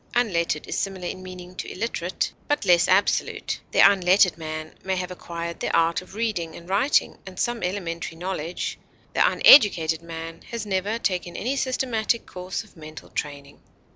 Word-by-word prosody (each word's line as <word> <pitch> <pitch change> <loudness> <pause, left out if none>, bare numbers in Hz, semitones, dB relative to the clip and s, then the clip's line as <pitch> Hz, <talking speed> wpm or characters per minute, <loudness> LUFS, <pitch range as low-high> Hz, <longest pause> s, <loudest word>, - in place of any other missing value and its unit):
Unlettered 170 -10 +1
is - - -3
similar 190 -2 -3
in 185 +1 -5
meaning 180 -1 -9
to - - -6
illiterate, 185 -4 -2
but 290 -6 0
less 175 -2 +5
absolute; 195 +2 +1
the - - -5
unlettered 190 -2 +5
man 155 -1 -6
may 190 0 -1
have 180 0 -3
acquired 170 -1 -6
the - - -2
art 165 +1 +2
of 185 +2 -14
reading 210 -8 -2
and 170 - -11
writing 205 +10 +2
and 185 -1 -9
some 240 -1 -1
elementary 170 -3 -3
knowledge; 180 -1 -4 0.3
the - - +1
uneducated 175 - +6
man 165 0 -8
has 230 -2 -4
never 200 +2 -1
taken 180 -5 -2
any 255 +5 -1
systematic 250 -4 0
course 185 +3 -5
of 215 - -21
mental 155 -1 -11
training. 140 -1 -6
180 Hz, 165 wpm, -24 LUFS, 170-205 Hz, 0.3 s, uneducated